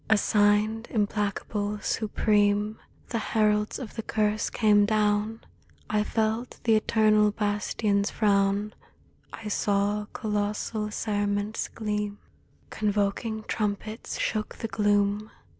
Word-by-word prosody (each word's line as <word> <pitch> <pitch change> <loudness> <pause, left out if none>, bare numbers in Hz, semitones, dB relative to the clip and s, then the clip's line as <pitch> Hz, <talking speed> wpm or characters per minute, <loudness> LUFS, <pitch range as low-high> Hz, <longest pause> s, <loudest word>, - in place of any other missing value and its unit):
Assigned, 210 +1 +3
implacable, 210 -1 -1
supreme, 210 -1 +1 0.3
The 230 - -1
heralds 210 -1 +1
of 245 -6 -7
the 225 - -3
Curse 215 -1 0
came 210 -2 +4
down: 210 +1 +1 0.5
I 210 0 +2
felt 220 +3 -1
the 230 - +3
eternal 215 -1 +4
bastions' 205 0 0
frown; 200 0 +1 0.6
I 220 - -8
saw 205 0 0
colossal 210 0 -2
cerements 205 0 -1
gleam. 210 -2 -3 0.5
Convoking 210 +1 -1
trumpets 215 +1 -3
shook 215 -1 -2
the 225 - -4
gloom. 205 0 +1
210 Hz, 100 wpm, -27 LUFS, 205-220 Hz, 0.6 s, came